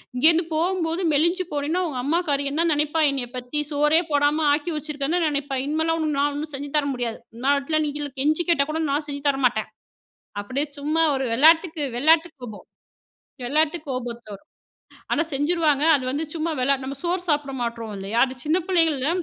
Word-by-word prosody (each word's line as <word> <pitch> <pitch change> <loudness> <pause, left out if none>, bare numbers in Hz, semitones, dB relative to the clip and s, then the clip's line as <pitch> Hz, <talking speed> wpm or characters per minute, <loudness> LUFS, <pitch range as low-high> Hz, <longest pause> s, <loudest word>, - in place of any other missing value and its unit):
இங்கேருந்து 325 +6 +4
போம்போது 335 +1 0
மெலிஞ்சு 340 +5 +2
போனன்னா, 295 +5 -1
உங்க 270 -5 -4
அம்மாக்காரி 290 -1 0
என்னா 325 +4 +1
நினைப்பா 300 +2 0
என்னைய 260 -3 -3
பத்தி? 250 +4 -3
சோறே 300 +3 +3
போடாம 290 +2 +2
ஆக்கி 310 +3 -1
வச்சுருக்கன்ல 300 +2 -2
நெனைப்பா, 285 -2 -2
இனிமேலாம் 320 +2 0
உனக்கு 305 -3 -1
நான் 290 +1 +2
ஒண்ணும் 295 +1 -5
செஞ்சு 285 +1 -6
தர 290 -1 +1
முடியாது. 240 -3 -3 0.2
என்னா 260 +3 -1
ஆகட்ன்னாலும் 310 +2 0
நீங் 295 0 -5
எல்லா 285 - -5
கெஞ்சி 310 +4 +1
கேட்டா 280 -4 +3
கூட 320 +1 -2
நான் 290 +2 -1
செஞ்சு 285 0 -6
தரமாட்டேன்"அப்டியே 270 -3 -1 1.0
சும்மா 305 +3 +1
ஒரு 265 0 -1
வெளாட்டுக்கு, 320 +4 +4
வெளாட்டு 320 +5 +4
கோபம், 220 -4 -9 0.8
வெளாட்டு 310 +5 +1
கோபத்துல 240 -4 -5
வரும். 200 +10 -15 0.6
ஆனா - - +2
செஞ்சுருவாங்க. 300 0 +1
அது 260 - -5
வந்து 295 +4 -2
சும்மா 325 +1 -1
வெளா 275 +2 +3
நம்ம 275 +1 -5
சோறு 350 +1 0
சாப்பிட 290 -2 0
மாட்றோம் 230 -2 -5
இல்லையா? 195 +4 -3
அது 260 - -7
சின்ன 315 +4 +3
பிள்ளைங்கள்ல, 325 -7 +2
295 Hz, 170 wpm, -23 LUFS, 275-320 Hz, 1.0 s, இங்கேருந்து